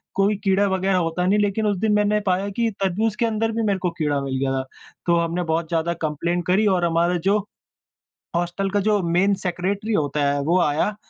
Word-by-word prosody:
कोई 200 +2 +2
कीड़ा 195 +1 +3
वग़ेेरह 190 0 +1
होता 170 +1 -1
नहीं 200 +3 +3
लेकिन 205 +1 0
उस 205 - 0
दिन 220 0 +1
मैंने 210 0 +2
पाया 190 +1 0
कि 230 +3 0
तरबूज 210 +3 0
के 235 - 0
अंदर 225 0 0
भी 225 0 -2
मेरे 200 -3 0
को 180 - 0
कीड़ा 145 -2 +1
मिल 135 -1 -3
गया 135 0 0
था। 130 - -1 0.4
तो 170 - +3
हमने 170 +1 -1
बहुत 160 0 -1
ज़्यादा 170 +1 0
कंप्लेंन 165 +3 -1
करी 205 +4 +3
और 180 -3 +2
हमारा 170 +1 +1
जो 210 - +4 1.0
हॉस्टल 175 +3 -1
का 205 +1 0
जो 210 -2 +2
मेन 195 +4 +3
सेक्रेटरी 195 +5 -2
होता 145 -3 0
है 145 - -1
वो 175 +5 +2
आया 160 +7 +1
185 Hz, 210 wpm, -22 LUFS, 170-205 Hz, 1.0 s, जो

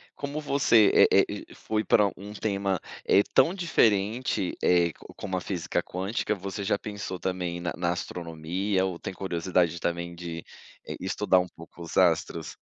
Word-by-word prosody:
Como 145 +2 -4
você, 130 -7 +5
eh - - +6
eh, - - -7
foi 110 0 -2
para 105 -2 +4
um 100 +2 -9
tema, 100 -3 -1 0.3
eh, 100 - +6
tão 135 +7 +5
diferente, 110 - +1
eh, 85 -1 +4
com - - -15
como 95 -2 -3
a - - -3
física 90 -3 -2
quântica, 100 +4 -2
você 100 +1 -5
já 100 - +1
pensou 100 -3 -6
também 90 -2 -2
na 85 - -2
na 85 0 0
astronomia 90 +3 -2
ou 90 -3 -4
tem - - -5
curiosidade 90 -2 0
também 85 0 -3
de 85 -1 -6 0.6
estudar 95 0 +2
um 90 - -1
pouco 85 +1 -13
os 85 - -7
astros? 85 -2 +2
95 Hz, 160 wpm, -27 LUFS, 85-105 Hz, 0.6 s, eh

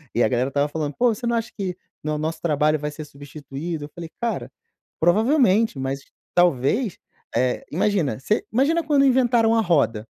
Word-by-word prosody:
E 120 - +3
a - - +4
galera 125 +3 0
estava 145 +1 +1
falando: 150 -2 -3
"Pô, 240 -1 +3
você 240 +2 -5
não 235 - +1
acha 230 0 -2
que, 185 -3 -3 0.3
né, 155 - -2
o 150 - -1
nosso 160 +2 -3
trabalho 155 -1 +2
vai 150 +1 -3
ser 155 +1 -7
substituído?" 145 +2 -7
Eu - - -12
falei: 170 -1 -8
"Cara, 235 -1 -2 0.5
provavelmente, 220 - +3
mas, 135 +1 -3 0.3
talvez, 175 - +2 0.4
eh", 125 +1 0
imagina. 170 - 0
Se 210 +11 0
imagina 295 +8 +2
quando 290 -2 +3
inventaram 240 -3 +3
a 225 - +4
roda. 120 - +1
165 Hz, 185 wpm, -23 LUFS, 145-230 Hz, 0.5 s, a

